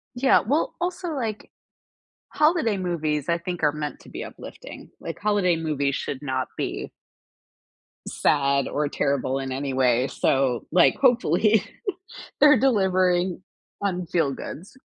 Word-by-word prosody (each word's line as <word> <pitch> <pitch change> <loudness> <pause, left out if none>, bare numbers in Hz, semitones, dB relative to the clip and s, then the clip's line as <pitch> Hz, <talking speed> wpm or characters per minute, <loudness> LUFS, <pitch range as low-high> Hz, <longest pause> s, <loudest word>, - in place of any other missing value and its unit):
Yeah. 260 +2 +4
Well, 290 +7 -1
also, 355 0 -3
like, 230 -9 -4 0.8
holiday 305 - +2
movies, 155 -6 -2
I 170 0 +2
think, 175 0 -5
are 150 -1 +3
meant 150 -1 -5
to - - -15
be - - -6
uplifting. - - -10
Like, 165 - -6
holiday 205 -4 +2
movies 145 -4 -1
should 130 - -4
not 130 -2 -2
be - - -4 1.2
sad 140 -2 +1
or 150 0 -1
terrible 140 -2 -1
in 135 -1 -4
any 135 +1 -3
way. 125 -1 +2
So, 130 -3 0
like, 175 +1 +5
hopefully, 220 - +3 0.8
they're 295 -2 +8
delivering 185 -7 +2 0.4
on 180 -3 -1
feel 160 -5 +1
goods. 165 - -8
170 Hz, 135 wpm, -24 LUFS, 140-215 Hz, 1.2 s, they're